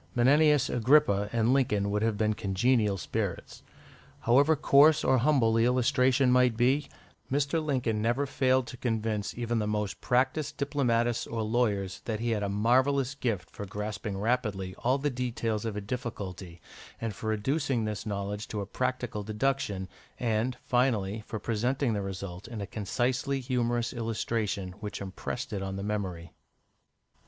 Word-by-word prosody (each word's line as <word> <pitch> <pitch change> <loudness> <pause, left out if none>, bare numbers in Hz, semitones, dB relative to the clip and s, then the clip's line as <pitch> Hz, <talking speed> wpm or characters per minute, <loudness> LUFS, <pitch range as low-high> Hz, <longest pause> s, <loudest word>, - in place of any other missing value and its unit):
Menenius 145 +3 +4
Agrippa 115 -5 +3
and 115 +1 +2
Lincoln 105 -7 +1
would 105 0 0
have 110 -1 +1
been 110 0 +2
congenial 105 +1 +1
spirits. - - -4 0.6
However 140 +7 +4
coarse 150 +2 +5
or 130 -1 +3
humble 125 -4 +3
the 115 0 +3
illustration 125 +1 +3
might 125 -2 +4
be, 135 +5 +2 0.4
Mr. 145 +3 +1
Lincoln 125 -7 0
never 120 +6 +1
failed 130 -1 +2
to 125 - -9
convince 110 -4 -2
even 120 -1 -1
the 105 - -1
most 105 -1 -2
practised 130 +4 0
diplomatists 120 -5 0
or 115 -1 -2
lawyers 105 -5 0
that 110 -2 -2
he 120 +1 -1
had 110 -2 0
a 100 - -1
marvellous 130 +6 +2
gift 115 -9 -3
for 100 - -7
grasping 105 0 -4
rapidly 105 -4 -1
all 130 +3 +2
the 145 +1 -1
details 115 -3 -2
of 110 -2 -3
a 105 - -3
difficulty, 100 -6 -6 0.4
and 115 -2 -3
for 110 - -7
reducing 130 +2 0
this 105 -2 -3
knowledge 100 0 -4
to 105 - -4
a 100 - -3
practical 125 0 -2
deduction, 105 -2 -1 0.3
and, 115 +1 0
finally, 110 -5 +1
for 110 - -4
presenting 120 +4 0
the 100 - -1
result 95 -1 -6
in 115 -2 -6
a 100 - -3
concisely 125 +7 -1
humorous 120 -2 -1
illustration 110 -4 -2
which 105 -1 -5
impressed 110 +6 -5
it 100 - -2
on 95 0 -4
the 100 - -4
memory. 95 -6 -3
115 Hz, 155 wpm, -29 LUFS, 105-130 Hz, 0.6 s, coarse